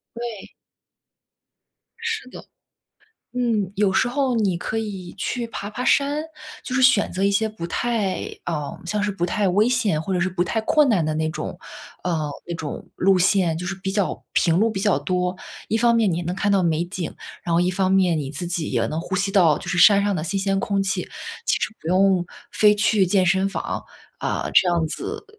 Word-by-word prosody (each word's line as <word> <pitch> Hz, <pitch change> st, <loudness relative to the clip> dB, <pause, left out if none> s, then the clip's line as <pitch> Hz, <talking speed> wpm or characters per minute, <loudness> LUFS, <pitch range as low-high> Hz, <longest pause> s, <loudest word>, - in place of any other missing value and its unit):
对。 235 Hz, -4 st, -7 dB, 1.5 s
是 450 Hz, -, -3 dB
的。 -, -, -10 dB, 0.9 s
嗯， 225 Hz, -6 st, 0 dB
有 205 Hz, -1 st, +3 dB
时 210 Hz, -, +2 dB
候 260 Hz, -1 st, 0 dB
你 195 Hz, -6 st, +1 dB
可 220 Hz, -, -4 dB
以 195 Hz, -5 st, -5 dB
去 235 Hz, +4 st, -2 dB
爬 205 Hz, -2 st, -6 dB
爬 230 Hz, +4 st, -5 dB
山。 285 Hz, +2 st, +2 dB, 0.4 s
就 255 Hz, -, -5 dB
是 265 Hz, -, +2 dB
选 255 Hz, -5 st, +5 dB
择 185 Hz, -, -3 dB
一 200 Hz, -, +3 dB
些 220 Hz, +2 st, +1 dB
不 210 Hz, -6 st, -6 dB
太 215 Hz, 0 st, -1 dB, 0.3 s
呃， 150 Hz, -4 st, -4 dB
像 210 Hz, +3 st, -1 dB
是 210 Hz, -, 0 dB
不 185 Hz, -3 st, -2 dB
太 195 Hz, +2 st, 0 dB
危 205 Hz, +4 st, +3 dB
险 220 Hz, -11 st, +1 dB
或 190 Hz, -, -3 dB
者 180 Hz, -, +1 dB
是 185 Hz, -, +1 dB
不 180 Hz, -1 st, -1 dB
太 220 Hz, +5 st, -1 dB
困 290 Hz, +6 st, +3 dB
难 195 Hz, -9 st, +2 dB
的 155 Hz, 0 st, -1 dB
那 155 Hz, 0 st, 0 dB
种 -, -, -6 dB, 0.5 s
呃， 160 Hz, -4 st, -1 dB, 0.2 s
那 170 Hz, -, -4 dB
种 160 Hz, -3 st, -6 dB
路 190 Hz, 0 st, +3 dB
线， 180 Hz, -3 st, +3 dB
就 180 Hz, -, -5 dB
是 195 Hz, -, -2 dB
比 190 Hz, 0 st, -4 dB
较 200 Hz, -1 st, -1 dB
平 170 Hz, 0 st, +3 dB
路 225 Hz, +2 st, +3 dB
比 195 Hz, -3 st, -3 dB
较 200 Hz, -8 st, +2 dB
多。 180 Hz, +4 st, -1 dB, 0.3 s
一 220 Hz, -, +1 dB
方 235 Hz, 0 st, +4 dB
面 215 Hz, -6 st, +2 dB
你 170 Hz, -, -1 dB
能 175 Hz, +2 st, -3 dB
看 200 Hz, +1 st, +1 dB
到 195 Hz, -2 st, +3 dB
美 165 Hz, 0 st, +1 dB
景， 180 Hz, -1 st, -5 dB, 0.3 s
然 170 Hz, -, -1 dB
后 170 Hz, -, +4 dB
一 180 Hz, +1 st, +2 dB
方 185 Hz, 0 st, 0 dB
面 185 Hz, -4 st, +3 dB
你 140 Hz, -2 st, -4 dB
自 165 Hz, +4 st, -4 dB
己 170 Hz, -2 st, -2 dB
也 -, -, +1 dB
能 155 Hz, +2 st, -3 dB
呼 185 Hz, +2 st, -3 dB
吸 195 Hz, +1 st, 0 dB
到， 170 Hz, -7 st, +5 dB
就 -, -, -9 dB
是 180 Hz, -, -1 dB
山 200 Hz, +2 st, +7 dB
上 205 Hz, -1 st, +1 dB
的 160 Hz, -, -2 dB
新 180 Hz, +5 st, -1 dB
鲜 195 Hz, 0 st, 0 dB
空 200 Hz, -1 st, 0 dB
气， 195 Hz, -1 st, -1 dB, 0.4 s
其 -, -, +2 dB
实 220 Hz, -, -3 dB
不 160 Hz, -, -6 dB
用 185 Hz, 0 st, +3 dB, 0.2 s
非 210 Hz, -1 st, +5 dB
去 210 Hz, -2 st, +3 dB
健 185 Hz, 0 st, +3 dB
身 190 Hz, +2 st, +2 dB
房。 195 Hz, -, -4 dB, 0.3 s
啊， -, -, -2 dB
这 180 Hz, -, +6 dB
样 170 Hz, -2 st, +1 dB
子 155 Hz, -, -5 dB
195 Hz, 230 characters per minute, -23 LUFS, 175-215 Hz, 1.5 s, 山